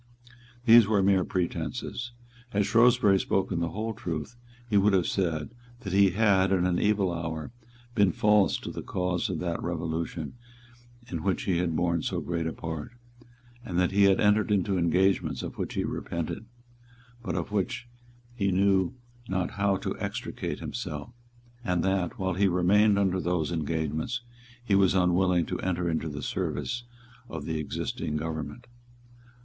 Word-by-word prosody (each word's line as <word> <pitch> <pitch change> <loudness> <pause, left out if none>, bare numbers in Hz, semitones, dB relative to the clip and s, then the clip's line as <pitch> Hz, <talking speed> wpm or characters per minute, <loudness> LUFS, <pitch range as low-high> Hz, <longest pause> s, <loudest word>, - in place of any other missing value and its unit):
These 115 -2 +8
were 100 -3 +3
mere 95 -1 +4
pretences. 95 +8 -3 0.4
Had 100 -3 +1
Shrewsbury 115 -4 +5
spoken 95 -2 0
the 85 0 -1
whole 110 +6 -3
truth, 85 +2 -5 0.3
he 110 - -1
would 100 +1 +5
have 90 -3 +3
said 85 -3 -1 0.3
that 95 -6 -5
he 100 0 +6
had, 95 -1 +3
in 90 -2 +3
an 90 -1 +1
evil 100 -4 +2
hour, 80 +1 -4 0.4
been 100 -5 +4
false 105 +2 +3
to - - -5
the - - -6
cause 90 +2 -1
of 90 - -2
that 85 -2 -2
Revolution 85 -2 -3 0.7
in 85 -8 -4
which 95 +3 0
he 90 -3 +1
had 85 -2 0
borne 85 0 +1
so - - -2
great 85 -2 -2
a - - -2
part, 80 +5 -6 0.7
that 90 -5 0
he 100 0 +5
had 95 -1 +4
entered 105 +1 +3
into 100 -1 +1
engagements 90 +2 +1
of - - -7
which - - -3
he - - 0
repented, 85 +6 -4 0.8
but 120 - -3
from - - -1
which 120 +5 -1 0.5
he 100 -5 0
knew 95 0 +2 0.3
not 95 -1 -1
how 100 -1 +1
to - - -3
extricate - - -4
himself, 75 +9 -5 0.5
and 90 -7 0
that, 95 -2 0
while 95 -1 -1
he 100 +3 +3
remained 100 +4 +4
under 95 -2 +1
those 85 -2 0
engagements, 80 - -2 0.4
he 105 - +1
was 95 -1 +4
unwilling 90 -1 +3
to - - -4
enter 90 -1 -1
into 80 -1 -1
the 75 -1 -6
service 120 - -2 0.4
of 80 -7 -6
the 80 -1 -2
existing 75 0 -3
government. 80 - -5
95 Hz, 160 wpm, -28 LUFS, 85-100 Hz, 0.8 s, These